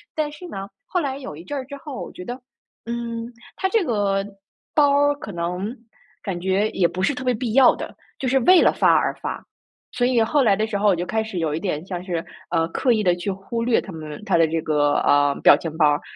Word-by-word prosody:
但 305 Hz, -1 st, -1 dB
是 300 Hz, +5 st, -10 dB
呢， 195 Hz, -, -6 dB, 0.2 s
后 360 Hz, -, -1 dB
来 270 Hz, -3 st, -2 dB
有 265 Hz, -, -8 dB
一 160 Hz, -, -10 dB
阵 285 Hz, +10 st, -5 dB
儿 260 Hz, -, -4 dB
之 280 Hz, +2 st, -8 dB
后， 280 Hz, -2 st, -7 dB
我 -, -, -9 dB
觉 180 Hz, -, -9 dB
得- 245 Hz, -, -4 dB, 0.5 s
嗯， 235 Hz, 0 st, -4 dB, 0.2 s
他 380 Hz, -, 0 dB
这 440 Hz, 0 st, +2 dB
个 200 Hz, -, 0 dB, 0.5 s
包 290 Hz, -2 st, +5 dB
儿 290 Hz, +1 st, +3 dB
可 255 Hz, -7 st, -8 dB
能 180 Hz, +6 st, -3 dB, 0.5 s
感 190 Hz, -4 st, -3 dB
觉 190 Hz, +4 st, +1 dB
也 175 Hz, -, +2 dB
不 175 Hz, +2 st, -5 dB
是 285 Hz, -, +1 dB
特 250 Hz, -, -6 dB
别 250 Hz, -1 st, +2 dB
必 230 Hz, -1 st, -3 dB
要 265 Hz, +1 st, +6 dB
的， -, -, -7 dB, 0.2 s
就 265 Hz, -, -2 dB
是 265 Hz, +2 st, +3 dB
为 360 Hz, +8 st, +6 dB
了 -, -, +5 dB
发 -, -, +4 dB
而 -, -, +2 dB
发。 -, -, -5 dB, 0.5 s
所 245 Hz, -, +1 dB
以 245 Hz, -2 st, +3 dB
后 285 Hz, +6 st, +2 dB
来 205 Hz, -5 st, +4 dB
的 215 Hz, +2 st, 0 dB
时 220 Hz, -1 st, -5 dB
候 210 Hz, -, +2 dB
我 190 Hz, -, +4 dB
就 175 Hz, +1 st, -3 dB
开 220 Hz, +4 st, -1 dB
始 220 Hz, -4 st, -6 dB
有 160 Hz, -3 st, -1 dB
一 155 Hz, -, -2 dB
点 165 Hz, -3 st, -3 dB
像 180 Hz, -2 st, -5 dB
是， 175 Hz, -3 st, -3 dB, 0.2 s
呃， 165 Hz, 0 st, +1 dB
刻 250 Hz, +9 st, +1 dB
意 215 Hz, -2 st, 0 dB
地 180 Hz, -2 st, +3 dB
去 175 Hz, +3 st, -4 dB
忽 195 Hz, +5 st, -4 dB
略 235 Hz, -1 st, +3 dB
他 195 Hz, -, -8 dB
们 155 Hz, -1 st, -8 dB
他 -, -, +2 dB
的 165 Hz, -, +5 dB
这 165 Hz, +1 st, -1 dB
个， 145 Hz, -2 st, +2 dB
呃， 145 Hz, 0 st, +3 dB
表 -, -, +9 dB
情 160 Hz, -2 st, -6 dB
包 155 Hz, -2 st, +5 dB
儿。 145 Hz, 0 st, +1 dB
210 Hz, 270 characters per minute, -22 LUFS, 175-255 Hz, 0.5 s, 表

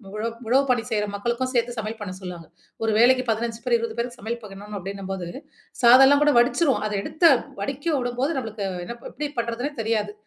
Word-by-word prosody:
உழ 215 Hz, -, -3 dB, 0.3 s
உழவு 265 Hz, +4 st, +4 dB
பணி 245 Hz, -2 st, +3 dB
செய்ற 210 Hz, -2 st, 0 dB
மக்களுக்கும் 240 Hz, +5 st, -2 dB
சேர்த்து 240 Hz, -1 st, 0 dB
சமையல் 220 Hz, +1 st, -4 dB
பண்ண 200 Hz, -3 st, -5 dB
சொல்லுவாங்க. 180 Hz, -3 st, -8 dB, 0.4 s
1 225 Hz, -, +2 dB
வேளைக்கு 255 Hz, +3 st, +5 dB
15 225 Hz, +1 st, -1 dB
பேர், 245 Hz, -1 st, +3 dB
20 230 Hz, 0 st, -4 dB
பேருக்கு 240 Hz, +1 st, -3 dB
சமையல் 235 Hz, +2 st, -4 dB
பண்ணணும் 205 Hz, +1 st, -9 dB
அப்படின்னம்போது, 195 Hz, -1 st, -5 dB, 0.6 s
சாதம்லாம் 270 Hz, +4 st, +8 dB
கூட 295 Hz, -1 st, +4 dB
வடிச்சிருவோம், 265 Hz, -1 st, +2 dB
அத -, -, -5 dB
எடுத்த 315 Hz, -, -6 dB, 0.4 s
வடிக்க 285 Hz, +3 st, -2 dB
உடும்போது 250 Hz, +6 st, -1 dB
நம்பளுக்கு 220 Hz, -4 st, -5 dB, 0.2 s
என்ன 235 Hz, -, -6 dB
ப -, -, -6 dB
எப்படி 295 Hz, 0 st, -4 dB
பண்ணுறதுன்னே 235 Hz, +4 st, -2 dB
தெரியாது. 215 Hz, -2 st, -1 dB
235 Hz, 180 wpm, -24 LUFS, 210-255 Hz, 0.6 s, சாதம்லாம்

